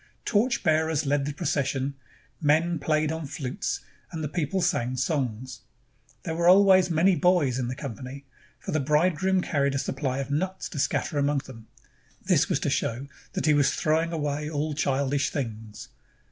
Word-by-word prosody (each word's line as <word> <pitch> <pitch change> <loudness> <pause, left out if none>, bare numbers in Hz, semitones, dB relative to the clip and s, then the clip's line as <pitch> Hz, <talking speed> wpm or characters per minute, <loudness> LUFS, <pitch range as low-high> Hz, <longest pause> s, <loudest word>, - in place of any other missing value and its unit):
Torch 240 +4 +1
bearers 160 -2 +2
led 140 0 +1
the 145 - -2
procession, 140 -2 -1 0.5
men 160 +2 +2
played 155 +1 +1
on 160 -2 -4
flutes, 130 -2 -4 0.3
and 160 -1 -5
the - - -1
people 165 +4 -1
sang 130 -8 0
songs. 130 -3 -2 0.6
There 165 - -3
were 170 +1 +1
always 190 -1 +6
many 175 +3 +3
boys 170 -9 +2
in 125 - -1
the 125 - -4
company, 130 +1 -7 0.3
for - - -7
the 155 - +1
bridegroom 170 +6 +2
carried 140 -4 0
a - - +1
supply 135 -1 -2
of 135 0 -4
nuts 185 +6 -2
to 150 - -6
scatter 145 +2 0
among 140 0 +1
them. 115 -4 -12 0.6
This - - +3
was - - +1
to - - 0
show 120 +4 -1 0.3
that - - -2
he 155 - +5
was 145 -2 +3
throwing 160 +2 +1
away 150 -2 -2
all 150 0 -2
childish 140 -1 0
things. 110 -6 -6
145 Hz, 170 wpm, -26 LUFS, 135-165 Hz, 0.6 s, always